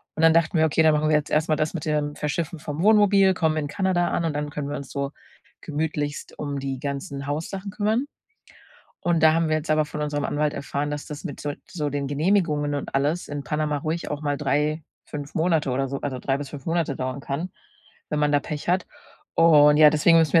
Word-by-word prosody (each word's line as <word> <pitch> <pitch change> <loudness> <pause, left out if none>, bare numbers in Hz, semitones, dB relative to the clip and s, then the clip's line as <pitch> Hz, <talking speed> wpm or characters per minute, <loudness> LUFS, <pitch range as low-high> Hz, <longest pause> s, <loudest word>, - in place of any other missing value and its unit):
Und 160 - -1
dann 165 - +7
dachten 165 +1 +2
wir: 160 - +4
„Okay, 160 +1 +2
dann 155 -1 +5
machen 150 +1 +1
wir 155 - +4
jetzt 150 -1 0
erst 155 +1 +1
mal 155 - +2
das 155 +3 -1
mit 160 - -4
dem 150 -1 -1
Verschiffen 160 +3 -3
vom 150 +1 -5
Wohnmobil, 200 -2 +5
kommen 160 -3 +1
in 150 -2 -1
Kanada 180 +1 0
an 170 - -1
und 160 - -1
dann 150 0 -2
können 145 -1 -4
wir 145 - -3
uns 140 - -8
so 140 0 -3 0.5
gemütlichst 150 -1 -3
um 145 -1 -3
die 135 -1 -4
ganzen 140 0 -5
Haussachen 165 +7 -4
kümmern.“ 215 +7 0 0.9
Und 170 -2 +1
da 155 - +6
haben 165 -1 +1
wir 155 - +2
jetzt 155 +1 -4
aber 155 0 +3
von 150 0 -5
unserem 145 -1 -2
Anwalt 150 0 0
erfahren, 140 +1 -3
dass 150 - -5
das 150 +4 -8
mit 145 -6 -6
so 145 - -3 0.2
so 150 -5 -3
den 140 0 -2
Genehmigungen 150 -1 +1
und 140 - -6
alles 145 +6 0
in 145 -1 -5
Panama 150 +2 -1
ruhig 160 +4 -3
auch 150 0 -4
mal 145 -1 0
3, 150 +2 0 0.2
5 145 0 -7
Monate 160 -3 +1
oder 135 +1 0
so 140 +1 -4
also, 130 -3 -4
3 135 +1 0
bis 140 -1 -6
5 140 -3 -9
Monate 165 -4 0
dauern 130 +1 -3
kann, 140 +6 -4 0.6
wenn 150 - -1
man 150 0 +2
da 145 - +4
Pech 150 +2 -6
hat. 180 0 +1 0.5
Und 150 -3 +6
ja, 155 -1 +9
deswegen 160 +2 +5
müssen 160 -3 +2
wir 165 - +8
150 Hz, 230 wpm, -24 LUFS, 145-165 Hz, 0.9 s, ja